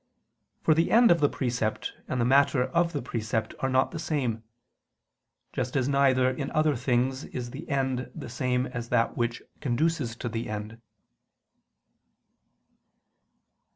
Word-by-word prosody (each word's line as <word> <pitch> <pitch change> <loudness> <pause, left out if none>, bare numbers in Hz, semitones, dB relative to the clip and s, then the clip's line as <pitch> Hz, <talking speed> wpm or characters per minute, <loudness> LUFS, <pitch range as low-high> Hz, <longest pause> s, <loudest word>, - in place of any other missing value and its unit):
For 160 - +5
the 165 +2 +2
end 235 -1 +6
of 170 - +4
the 145 -1 +4
precept 120 -4 -2
and 130 - -2
the 120 - +2
matter 135 0 +4
of 170 +6 +1
the 145 -5 -3
precept 110 -2 -2
are 135 - 0
not 130 0 +2
the 165 - -5
same: 130 -9 -1 1.1
just 130 +3 -2
as 130 -1 +1
neither 135 -2 +3
in 135 +1 -4
other 155 -1 +3
things 130 +2 0
is 120 -1 -6
the 140 +7 -8
end 130 -2 -1
the - - -7
same 125 +1 0
as 120 -2 -6
that 115 - +2
which 120 0 -2 0.2
conduces 140 -2 0
to 120 - -5
the 115 0 -4
end. 105 +2 -6
130 Hz, 150 wpm, -27 LUFS, 120-140 Hz, 1.1 s, end